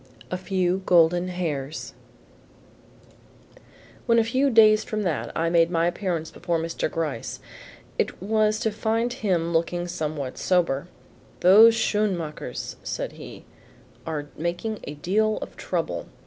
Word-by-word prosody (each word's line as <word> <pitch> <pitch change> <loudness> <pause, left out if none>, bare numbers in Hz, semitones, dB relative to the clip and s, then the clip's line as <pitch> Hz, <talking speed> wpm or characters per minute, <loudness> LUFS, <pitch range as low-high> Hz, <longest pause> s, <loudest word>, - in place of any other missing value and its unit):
A - - 0
FEW 185 0 0
GOLDEN 175 0 +4
HAIRS 160 -5 -4 2.1
When 230 -1 +4
a 230 - +5
few 260 +5 +1
days 215 -3 +6
from 215 -3 -3
that 170 -6 -2
I 165 +1 +1
made 170 -1 +4
my 165 -1 +1
appearance 175 -2 -2
before 170 -1 -2
Mr. 165 -1 -2
Gryce, 155 -8 -4 0.6
it - - -1
was 215 +2 +1
to 220 - +1
find 225 +3 -1
him 180 -9 -1
looking 175 +2 0
somewhat 155 -6 -4
sober. 170 -5 +1 0.5
"Those 220 +5 +8
Schoenmakers," 190 -9 -2
said - - -4
he, - - -11 0.6
"are 150 -2 -4
making 175 +7 -3
a 145 - -6
deal 215 +8 +1
of - - -7
trouble. - - -3
180 Hz, 130 wpm, -25 LUFS, 165-215 Hz, 2.1 s, Those